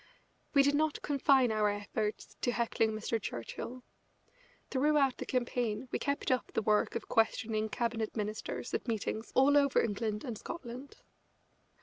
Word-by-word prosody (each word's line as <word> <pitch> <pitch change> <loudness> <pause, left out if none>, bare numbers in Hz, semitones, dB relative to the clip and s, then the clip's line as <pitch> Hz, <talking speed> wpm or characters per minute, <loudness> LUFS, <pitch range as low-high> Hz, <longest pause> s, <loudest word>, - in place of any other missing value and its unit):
We 280 - +7
did 285 +1 +3
not 305 +1 +1
confine 270 -3 +4
our 215 -1 +2
efforts 205 +1 -3
to 245 - +1
heckling 230 -2 +1
Mr. 220 +1 -2
Churchill. 235 - -6 0.9
Throughout 280 -1 +3
the - - -6
campaign 245 -1 -1
we - - -1
kept 280 -2 -1
up 255 - 0
the 225 - 0
work 210 0 +2
of - - -4
questioning 220 -1 +1
Cabinet 230 0 -2
Ministers 215 +3 -4
at - - -2
meetings 220 0 -2
all 270 +3 +5
over 280 -2 +4
England 210 0 -1
and 235 -5 -5
Scotland. 260 -1 -8
235 Hz, 145 wpm, -32 LUFS, 215-265 Hz, 0.9 s, We